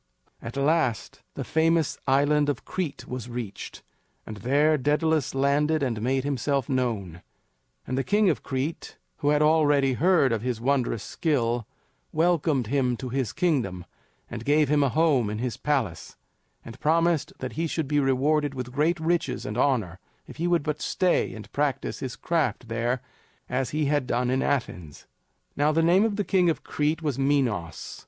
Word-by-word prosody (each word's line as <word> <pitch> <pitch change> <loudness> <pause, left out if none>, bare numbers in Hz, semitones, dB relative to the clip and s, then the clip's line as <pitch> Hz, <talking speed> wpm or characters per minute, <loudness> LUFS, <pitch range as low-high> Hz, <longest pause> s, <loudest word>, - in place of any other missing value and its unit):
At 115 +4 -7
last 140 - 0
the - - -4
famous 160 -1 +1
Island 145 +2 +3
of 145 - -3
Crete 175 -7 -4
was 125 -1 -6
reached, 120 -4 -7 0.4
and 110 - -7
there 145 +8 +3
Daedalus 150 +1 +1
landed 145 +3 +2
and 115 -5 -1
made 130 +3 0
himself 140 -1 -1
known; 110 - -2 0.6
and 130 - -3
the 135 - 0
King 205 +4 +2
of 170 - +1
Crete, 135 +5 -4 0.2
who 145 - 0
had 150 0 +3
already 145 -3 +3
heard 165 -2 +3
of 110 - -1
his 125 -2 -2
wondrous 125 -4 0
skill, 120 -8 -1 0.4
welcomed 160 -6 +1
him 125 0 0
to 130 - -6
his 130 -3 -1
kingdom, 125 - -1 0.4
and 115 -1 -7
gave 145 +2 +3
him 150 0 +3
a 140 - +3
home 145 -6 +2
in 105 - -3
his 120 -1 -3
palace, 130 - -2 0.5
and 115 - -10
promised 165 0 +1
that 130 - -5
he 165 +1 -1
should 160 -2 -2
be 145 +1 +2
rewarded 140 +2 +1
with 125 -1 -5
great 155 +6 +1
riches 165 +1 -1
and 105 - -4
honor 115 -9 0 0.3
if - - -12
he 170 +2 -1
would 175 -3 +2
but 150 0 -3
stay 185 -2 +1
and 110 - -10
practice 140 -2 -1
his 130 -3 -5
craft 160 -7 -1
there 120 +2 -1 0.5
as 130 0 -1
he 155 0 -1
had 145 -2 0
done 125 0 0
in 130 +1 +1
Athens. 90 - -3 0.5
Now 145 +2 +2
the 165 +1 +2
name 180 +6 +4
of 220 -2 -1
the 205 - 0
King 185 -3 +2
of 160 - -2
Crete 155 +2 -1
was 145 -4 -1
Minos. 125 - -1
140 Hz, 175 wpm, -26 LUFS, 125-155 Hz, 0.6 s, name